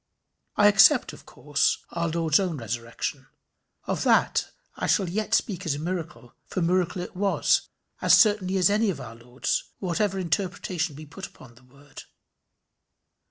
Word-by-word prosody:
I 205 - +5
except 215 +6 +5
of - - -15
course 145 -1 0
our 170 0 -2
Lord's 160 0 +2
own 180 -5 -2
resurrection. 115 +3 -5 0.6
Of - - -2
that - - +2 0.3
I - - -3
shall 195 -4 +2
yet 215 +5 0
speak 195 -4 -1
as 160 -6 -1
a - - -6
miracle, 165 -6 -5
for - - -4
miracle 180 +1 0
it - - -10
was, 195 +1 +1 0.3
as - - +6
certainly 200 -3 +3
as 185 +1 +4
any 215 +1 +2
of 165 -8 -3
our 120 -4 -8
Lord's, 120 +2 -3
whatever 195 +2 -1
interpretation 180 -2 -2
be 155 +2 -10
put 160 +6 -9
upon 120 -2 -17
the 120 +2 -21
word. 140 +2 -14
175 Hz, 160 wpm, -25 LUFS, 145-195 Hz, 0.6 s, as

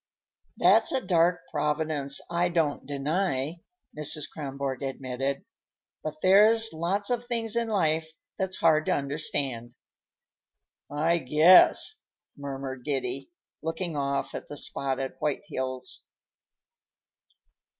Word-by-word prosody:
"That's - - +5
a 265 - +1
dark 175 0 +3
Providence, 150 -2 0
I 175 +1 0
don't 160 -4 -1
deny," 150 +1 -2 0.3
Mrs. 150 0 -2
Kronborg 140 -3 -4
admitted. 135 0 -3 0.6
"But 155 0 -6
there's 215 +3 +6
lots 190 +7 -1
of 245 0 -1
things 230 -2 0
in 235 0 0
life 160 -6 0 0.2
that's 190 -1 -3
hard 155 0 +3
to - - +3
understand." 140 -4 -2 1.1
"I 165 +4 +1
guess!" 165 - +5 0.4
murmured 135 -2 -6
Giddy, 135 -1 -3 0.3
looking 165 +1 -3
off 140 -1 -2
at - - -6
the 145 - -8
spotted 135 -1 -2
white 150 -2 -1
hills. 130 -1 -3
150 Hz, 110 wpm, -27 LUFS, 140-175 Hz, 1.1 s, there's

